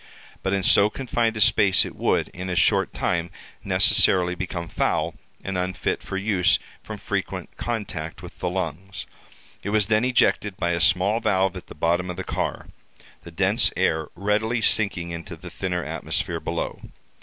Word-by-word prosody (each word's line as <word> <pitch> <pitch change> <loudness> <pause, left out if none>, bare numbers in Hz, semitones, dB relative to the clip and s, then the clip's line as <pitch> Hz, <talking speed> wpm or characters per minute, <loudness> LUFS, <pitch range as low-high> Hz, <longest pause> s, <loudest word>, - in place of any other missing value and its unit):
But 95 - -1
in 100 -1 0
so 100 +3 +5
confined 115 -3 -1
a - - -2
space 100 -3 +5
it - - -8
would, - - +1
in 90 +1 -7
a 90 - -1
short 85 - +3
time, 85 -1 -1 0.3
necessarily 90 -1 +4
become 85 -1 -4
foul, - - 0 0.3
and 95 -2 -2
unfit 90 +1 -2
for 95 - -5
use 95 -3 +3 0.2
from - - -7
frequent - - -4
contact 95 -8 -4
with 90 - -11
the 90 - -1
lungs. 95 +1 -4 0.6
It 100 - -4
was 105 0 +2
then 110 +1 +3
ejected 105 -5 +2
by 85 -2 0
a 85 -1 0
small 100 +5 +3
valve 95 -4 +1
at - - -9
the - - -11
bottom 85 +3 0
of 90 - -5
the 90 - -3
car—the - - -7
dense - - +2
air 80 -1 +1
readily 105 +4 0
sinking 90 -5 +1
into 85 +2 -7
the 85 +2 -11
thinner 90 -2 -2
atmosphere 80 +3 -3
below. - - -4
95 Hz, 165 wpm, -24 LUFS, 85-105 Hz, 0.6 s, so